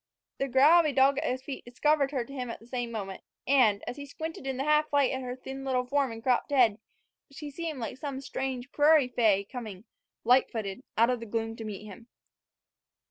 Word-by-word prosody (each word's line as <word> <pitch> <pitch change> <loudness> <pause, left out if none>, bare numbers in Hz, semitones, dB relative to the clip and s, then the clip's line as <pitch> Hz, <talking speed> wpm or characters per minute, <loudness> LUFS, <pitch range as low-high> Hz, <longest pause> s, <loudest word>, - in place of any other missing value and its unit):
The 275 - 0
growl 280 +7 +6
of 330 - +3
a - - +1
dog 270 +1 +4
at - - -1
his 255 +1 -3
feet 270 -1 -7
discovered 280 +3 +1
her 260 -4 -2
to 275 - -11
him 250 -3 -4
at 230 - -6
the 225 - -17
same 245 -1 -3
moment, 195 -4 -5 0.2
and, 245 -7 +4
as 250 - -5
he 285 0 -8
squinted 320 -1 -6
in 265 -1 -2
the 270 - -1
half 300 +1 +2
light 285 -2 +3
at 260 - -3
her 250 -1 -5
thin 265 +1 -8
little 255 -2 0
form 275 -1 0
and 225 0 -9
cropped 250 +2 +1
head, 240 -7 +3 0.5
she 290 +1 -8
seemed 320 0 -5
like 235 0 -5
some 275 -1 -5
strange 265 -1 -4
prairie 295 -3 +4
fay 215 -5 +3
coming, 210 -3 -8 0.4
light 250 +3 +4
footed, 210 -1 -5 0.2
out 230 +3 +5
of 250 - -1
the 230 - -8
gloom 225 +1 -2
to 225 - -7
meet 210 -1 -7
him. 215 +3 -12
255 Hz, 225 wpm, -29 LUFS, 230-280 Hz, 0.5 s, growl